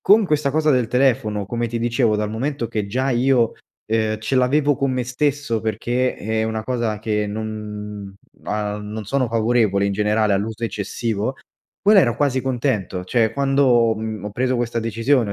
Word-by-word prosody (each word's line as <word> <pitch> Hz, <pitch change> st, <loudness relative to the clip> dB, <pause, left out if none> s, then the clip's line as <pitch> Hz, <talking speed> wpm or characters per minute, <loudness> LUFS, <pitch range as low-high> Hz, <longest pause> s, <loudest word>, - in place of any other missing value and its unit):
Con 205 Hz, +1 st, +5 dB
questa 150 Hz, -3 st, +1 dB
cosa 155 Hz, +2 st, +2 dB
del 125 Hz, -5 st, +2 dB
telefono, 120 Hz, -6 st, +1 dB
come 120 Hz, +3 st, -2 dB
ti 115 Hz, -, -3 dB
dicevo 115 Hz, -1 st, +1 dB
dal 105 Hz, 0 st, -1 dB
momento 130 Hz, +2 st, -2 dB
che 105 Hz, -2 st, -3 dB
già 130 Hz, +6 st, -1 dB
io, 125 Hz, -1 st, +3 dB, 0.3 s
ehm, 110 Hz, -1 st, 0 dB
ce 110 Hz, +5 st, -3 dB
l’avevo 140 Hz, +3 st, +3 dB
con 135 Hz, +1 st, 0 dB
me 125 Hz, -1 st, -1 dB
stesso 130 Hz, -2 st, -1 dB
perché 120 Hz, +4 st, -1 dB
è 110 Hz, +1 st, -1 dB
una 110 Hz, 0 st, -2 dB
cosa 115 Hz, -3 st, -1 dB
che 105 Hz, -1 st, -1 dB
non 105 Hz, -1 st, -6 dB, 0.3 s
uhm, 105 Hz, 0 st, -2 dB
non 105 Hz, +1 st, -6 dB
sono 130 Hz, +4 st, 0 dB
favorevole 110 Hz, -3 st, +2 dB
in 100 Hz, -, 0 dB
generale 105 Hz, +1 st, +1 dB
all’uso 110 Hz, +3 st, -2 dB
eccessivo, 110 Hz, +2 st, -2 dB, 0.5 s
quella 205 Hz, -1 st, +6 dB
ero 120 Hz, -8 st, +1 dB
quasi 140 Hz, -3 st, +1 dB
contento 115 Hz, -8 st, -1 dB
cioè 110 Hz, +3 st, +1 dB
quando, 135 Hz, -5 st, +3 dB
mhmm, 110 Hz, -2 st, -5 dB
ho 105 Hz, -, -4 dB
preso 125 Hz, +3 st, 0 dB
questa 120 Hz, -1 st, -1 dB
decisione, 115 Hz, +1 st, +1 dB
ho -, -, -2 dB
115 Hz, 175 wpm, -21 LUFS, 105-130 Hz, 0.5 s, quella